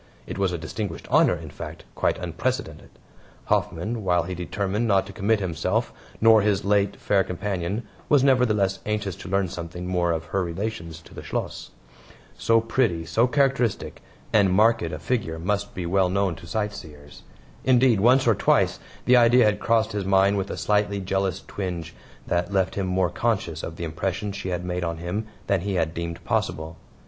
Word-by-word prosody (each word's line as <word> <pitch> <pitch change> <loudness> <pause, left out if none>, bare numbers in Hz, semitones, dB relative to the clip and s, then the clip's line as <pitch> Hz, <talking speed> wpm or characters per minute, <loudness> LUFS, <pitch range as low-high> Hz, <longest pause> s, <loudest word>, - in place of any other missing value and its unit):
It - - -6
was 95 -2 +2
a 90 - -2
distinguished 85 +3 -5
honor - - +5
in - - -9
fact, - - -8
quite - - 0
unprecedented. 90 - -3 0.6
Hoffman, 110 +7 -1
while 90 -2 +2
he 90 +2 -5
determined 100 +5 -2
not 100 -3 +3
to - - -10
commit 110 +1 +1
himself, 95 +5 -1 0.3
nor 110 -1 +6
his 100 -1 +1
late 100 0 +2
fair 100 -2 +2
companion, 95 +3 -3 0.2
was 145 -3 +5
nevertheless 105 -8 +3
anxious 105 -4 -2
to - - -9
learn 95 0 +1
something 85 +1 -6
more 90 -1 +1
of 80 0 -2
her 95 -1 +2
relations 85 -2 -5
to - - -16
the - - -8
Schloss. - - -4 0.7
So 115 0 +3
pretty, 110 -8 0
so 115 +7 +2
characteristic, 135 -5 0 0.3
and 100 -3 +5
marked 110 +4 +4
a - - -3
figure 110 -11 -2
must 100 +4 -2
be 90 - -3
well 95 +1 +2
known 100 -1 +1
to 85 - -12
sightseers. 80 -9 -5 0.4
Indeed, 125 -4 +4
once 125 +5 +5
or 115 - +5
twice - - +2 0.3
the 125 - +6
idea 120 0 +6
had 105 -1 +2
crossed 115 -1 +2
his 105 -1 -2
mind 95 +1 +3
with 95 0 -2
a - - -4
slightly 105 -1 +1
jealous 95 -1 -1
twinge 85 -4 -5 0.3
that 90 +3 -1
left 95 -2 +1
him 95 -2 -2
more 90 -1 +1
conscious 90 -6 -1
of 80 - -6
the 85 - -6
impression 90 +5 -3
she 100 -1 -5
had 90 0 -3
made 90 0 -2
on 85 -1 -2
him 90 +6 -4 0.2
than 100 -3 +1
he 100 +1 -2
had 80 -2 0
deemed 85 +1 -5
possible. 80 0 -2
95 Hz, 180 wpm, -25 LUFS, 85-110 Hz, 0.7 s, nor